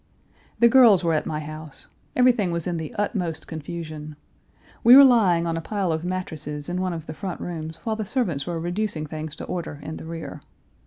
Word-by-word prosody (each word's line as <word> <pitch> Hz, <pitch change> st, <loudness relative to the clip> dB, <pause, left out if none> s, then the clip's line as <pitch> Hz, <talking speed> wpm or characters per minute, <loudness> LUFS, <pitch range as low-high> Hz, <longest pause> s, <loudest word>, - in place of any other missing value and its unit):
The 235 Hz, -, +6 dB
girls 230 Hz, -7 st, +6 dB
were 165 Hz, -1 st, +2 dB
at 155 Hz, -, 0 dB
my 155 Hz, 0 st, -3 dB
house. 155 Hz, -1 st, -9 dB, 0.3 s
Everything 245 Hz, -6 st, +4 dB
was 170 Hz, -1 st, -2 dB
in 175 Hz, -2 st, -2 dB
the 160 Hz, -1 st, -5 dB
utmost 190 Hz, -6 st, -2 dB
confusion. 155 Hz, -1 st, -7 dB, 0.7 s
We 245 Hz, +3 st, +10 dB
were 280 Hz, -, +11 dB
lying 200 Hz, -10 st, +4 dB
on 165 Hz, -1 st, -1 dB
a 165 Hz, -, -3 dB
pile 195 Hz, -1 st, -1 dB
of 160 Hz, 0 st, -2 dB
mattresses 155 Hz, -5 st, -4 dB
in 180 Hz, +1 st, -2 dB
one 185 Hz, -1 st, -1 dB
of 165 Hz, -2 st, -6 dB
the 155 Hz, -, -6 dB
front 185 Hz, +1 st, -5 dB
rooms 160 Hz, -2 st, -5 dB
while 220 Hz, -1 st, -1 dB
the 215 Hz, -, -3 dB
servants 185 Hz, -, -1 dB
were 170 Hz, -2 st, -2 dB
reducing 175 Hz, -1 st, -2 dB
things 155 Hz, 0 st, -6 dB
to -, -, -8 dB
order 165 Hz, -4 st, -5 dB
in 155 Hz, -, -6 dB
the -, -, -9 dB
rear. 165 Hz, 0 st, -7 dB
170 Hz, 205 wpm, -24 LUFS, 155-200 Hz, 0.7 s, were